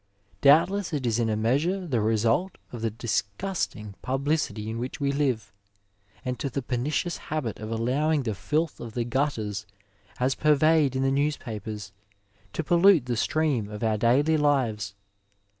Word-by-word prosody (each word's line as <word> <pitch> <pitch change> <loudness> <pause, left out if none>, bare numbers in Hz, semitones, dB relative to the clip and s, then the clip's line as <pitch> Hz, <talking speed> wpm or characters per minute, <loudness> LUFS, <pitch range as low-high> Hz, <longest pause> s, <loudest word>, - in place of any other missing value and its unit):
Doubtiess 175 +6 +4
it 140 -4 -1
is 115 -1 +1
in 115 -1 +1
a 110 - +1
measure 145 - +1
the 125 -9 0
result 115 - +1
of 120 - -7
the 115 - +1
disgusting 105 - -3
publicity 135 -4 -1
in 115 +1 -3
which 125 +4 -5
we 140 -1 +1
live, 125 -8 -1 0.7
and 125 -1 -3
to 140 - -2
the 135 +1 -3
pernicious 145 +8 -1
habit 145 -8 -2
of 110 0 -6
allowing 135 +7 +1
the 110 -3 -1
filth 150 - -1
of 115 -2 -7
the 120 - 0
gutters 115 -6 -1 0.5
as 130 +2 +2
purvejred 150 -1 +3
in 130 - +1
the 135 - +2
newspapers 110 -8 -2 0.6
to 160 - -3
pollute 175 -2 +5
the 125 -1 -1
stream 135 -4 0
of 105 +1 -6
our 110 -1 +2
daily 140 +8 +3
lives. 115 -9 +1
130 Hz, 160 wpm, -26 LUFS, 110-150 Hz, 0.7 s, pollute